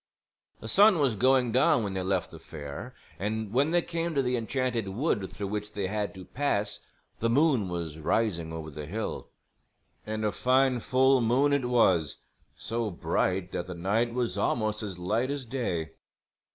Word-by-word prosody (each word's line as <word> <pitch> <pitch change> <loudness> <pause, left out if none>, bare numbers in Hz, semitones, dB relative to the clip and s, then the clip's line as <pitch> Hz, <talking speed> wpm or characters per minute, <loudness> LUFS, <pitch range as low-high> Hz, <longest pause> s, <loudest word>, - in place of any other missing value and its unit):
The - - -7
sun 200 - +6
was 135 -7 +2
going 130 +1 +3
down 130 0 +4
when 100 -2 -3
they 95 - -2
left 95 -1 -1
the - - -10
fair 75 -3 -8 0.2
and 105 +1 -3
when 140 +5 +3
they 175 0 +2
came 170 -1 -3
to 135 - +2
the 125 0 0
Enchanted 120 -2 -1
Wood 100 - -1
through 100 -1 -5
which 105 0 -4
they 100 -2 -2
had 105 +1 -2
to 95 -1 -9
pass 105 -7 -1 0.4
the 115 - +1
moon 130 - +3
was 85 -3 -4
rising 85 -1 0
over 80 -1 -6
the 75 0 -7
hill. 110 +6 -4 0.7
And 110 0 -3
a 105 - +1
fine 130 +1 +2
full 130 +2 +3
moon 130 +5 +3
it 140 -3 +1
was, 95 - +3 0.4
so 115 0 -2
bright 90 0 -1
that 85 - -3
the 90 - -6
night 105 +7 0
was 120 -5 -1
almost 110 0 0
as 100 -4 -5
light 110 +8 0
as 140 -2 -3
day. 100 -11 -2
110 Hz, 180 wpm, -28 LUFS, 95-130 Hz, 0.7 s, sun